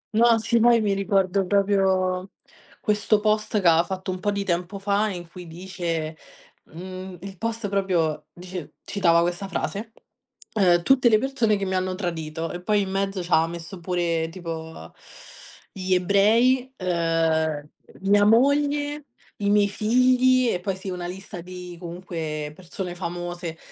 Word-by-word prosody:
No. 230 0 +5
Sì, 235 +1 +1
poi 235 0 +6
mi 205 -2 +1
ricordo 195 -1 +1
proprio, 190 -1 +1 0.5
questo 210 0 +2
post 215 0 +1
che 180 - +3
aveva 165 0 +6
fatto 185 +1 -4
un 185 - -5
po' 205 - +1
di 200 0 -2
tempo 180 +3 -2
fa, 205 +2 +1
in 175 -3 -6
cui 180 0 -10
dice 165 -2 -4 0.5
mhmm, 185 +2 -8
il 195 -1 -9
post 230 +1 -3
proprio 180 -7 0
dice 180 -2 -8
citava 170 -4 +3
questa 175 +3 -2
frase: 210 +3 -3 0.6
"Uhm 180 -5 +4
tutte 255 +2 +5
le 215 - +5
persone 235 -5 +1
che 195 - -2
mi 190 - -1
hanno 185 0 -1
tradito". 165 -3 -4
E 175 - -6
poi 210 +2 +2
in 190 - -3
mezzo 195 0 -1
c'ha 165 -2 +3
messo 170 +2 -8
pure 170 -2 -1
tipo, 165 -2 -6
mhmm, 80 - -11 0.8
gli 185 -1 -1
ebrei, 230 +8 +3
uhm, 165 -4 0 0.3
mia 205 +1 +4
moglie, 290 +5 +2 0.3
i 200 -1 -1
miei 205 0 +4
figli 255 +4 +3
e 180 - -1
poi 195 0 -2
sì, 190 +1 -7
una 180 -1 -4
lista 190 0 -8
di, 180 0 -9
comunque, 165 -4 -5
persone 180 0 -6
famose 175 -1 -5
185 Hz, 155 wpm, -24 LUFS, 175-210 Hz, 0.8 s, poi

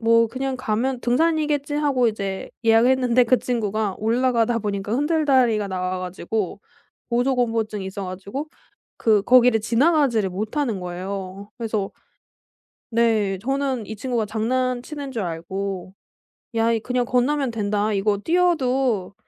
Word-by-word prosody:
뭐 230 0 +4
그냥 265 +2 -3
가면 250 +1 -1
등산이겠지 295 +2 +1
하고 280 -5 +2
이제 200 -3 -4 0.2
예약을 225 +2 +5
했는데 250 -1 +3
그 250 +1 +3
친구가 215 -4 -1
올라가다 235 +1 +1
보니까 205 0 -3
흔들 305 +4 +1
다리가 240 -7 +3
나와 185 0 -2
가지고 185 +2 -3 0.5
고조공포증이 230 -5 0
있어 195 +1 -5
가지고 200 +11 -6 0.5
그 215 -3 +3
거기를 245 -2 +5
지나가지를 235 - +2
못하는 215 +4 -2
거에요. 190 +2 -6
그래서 220 -4 -2 1.0
네. 220 -4 +2
저는 270 -2 -1
이 220 - -6
친구가 235 0 -1
장난치는 255 +5 -2
줄 230 -5 -3
알고 185 +2 -4 0.6
"야 225 0 +3
이 230 - +1
그냥 250 +2 -1
건너면 255 +2 +1
된다. 210 -1 0
이거 205 +1 +1
뛰어도 265 - +1
230 Hz, 305 characters per minute, -23 LUFS, 205-255 Hz, 1.0 s, 예약을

